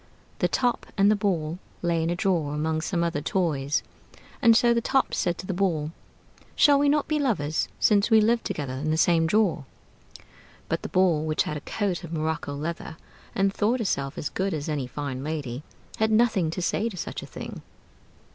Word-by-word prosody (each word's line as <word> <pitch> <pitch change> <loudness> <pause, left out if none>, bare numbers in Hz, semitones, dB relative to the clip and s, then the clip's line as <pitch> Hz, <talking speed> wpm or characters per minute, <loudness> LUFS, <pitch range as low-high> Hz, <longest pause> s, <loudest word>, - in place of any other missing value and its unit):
The - - +3
Top 245 -2 0
and 200 +1 +5
the - - +4
Ball 180 -5 -1 0.2
lay 170 -1 +1
in 165 - 0
a 175 - 0
drawer 170 -6 0
among 155 +1 -1
some 170 +1 -1
other 165 -4 -1
toys; 150 -5 0 0.6
and 230 -3 +6
so 240 -1 +4
the 235 - +1
Top 265 +3 +1
said 175 -2 0
to - - -7
the 190 - -2
Ball: 170 -5 0 0.6
"Shall 285 -2 +6
we 285 0 +3
not 295 0 +2
be 305 -1 0
lovers, 160 - 0
since 205 0 +3
we 220 -1 +6
live 230 +2 +2
together 140 -3 -3
in 140 +4 -3
the 155 - +1
same 165 -1 +3
drawer?" 195 -5 +2 1.0
But - - -1
the - - -6
Ball, 180 -5 +3
which 155 -1 +1
had 150 - -4
a 150 - -5
coat 195 -1 -2
of 165 - -8
morocco 155 -3 -2
leather, 160 +2 -5 0.4
and 195 0 +2
thought 220 +5 +1
herself 155 - -2
as 150 - -3
good 190 -1 -1
as 145 -1 -4
any 145 -5 -2
fine 135 -1 -5
lady, 145 -5 -4 0.4
had 220 0 +2
nothing 220 -6 +3
to 175 +3 -3
say 225 +6 0
to 195 - -9
such - - -5
a - - -9
thing. - - -8
170 Hz, 200 wpm, -26 LUFS, 155-210 Hz, 1.0 s, and